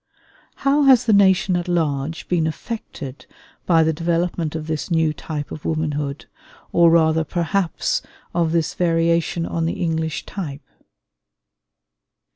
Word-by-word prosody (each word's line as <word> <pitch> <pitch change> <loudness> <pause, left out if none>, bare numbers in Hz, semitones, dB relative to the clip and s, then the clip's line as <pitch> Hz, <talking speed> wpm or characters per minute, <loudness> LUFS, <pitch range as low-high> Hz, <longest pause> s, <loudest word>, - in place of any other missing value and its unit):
How 280 +2 +4
has 260 -3 +6
the 225 - +3
nation 190 -2 +4
at 175 0 -2
large 160 -3 -1
been 165 -3 +1
affected 160 - -7 0.4
by 165 -2 +5
the 160 0 +1
development 170 0 -1
of 155 -1 -4
this 155 +1 -3
new 160 -2 +2
type 150 -1 -6
of 155 - -7
womanhood, 150 -3 -2 0.5
or 170 -1 +5
rather 160 -1 +4
perhaps 175 +2 -1 0.3
of 170 -2 +1
this 165 -2 0
variation 170 -1 +1
on 165 -1 -2
the 165 - 0
English 160 -3 -2
type? 145 -8 -6
165 Hz, 130 wpm, -21 LUFS, 155-175 Hz, 0.5 s, has